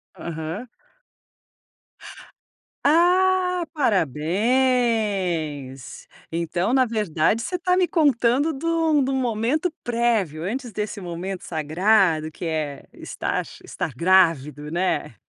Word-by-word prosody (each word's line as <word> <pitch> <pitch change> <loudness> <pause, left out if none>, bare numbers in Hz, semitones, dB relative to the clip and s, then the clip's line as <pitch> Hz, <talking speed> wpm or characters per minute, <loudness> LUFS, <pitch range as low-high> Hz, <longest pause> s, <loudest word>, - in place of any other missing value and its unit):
Aham. 160 +8 -6 2.2
Ah, 360 +3 +3
parabéns! 190 - 0 0.2
Então, 170 +6 -1
na 260 -1 +5
verdade 215 -3 0
você 360 - -3
está 360 +1 +1
me 365 -2 +3
contando 285 -2 +2
de 295 +2 -7
um 325 -3 +2
de 270 - 0
um 270 - 0
momento 255 +7 0
prévio, 230 -10 0
antes 240 +4 -4
desse 210 0 -4
momento 180 +1 -5
sagrado, 160 +1 +2
que 160 - -11
é 155 -4 -3
estar - - -3 0.2
estar 150 - -5
grávido, 150 -4 +2
né. 165 - -1
210 Hz, 100 wpm, -23 LUFS, 160-265 Hz, 2.2 s, na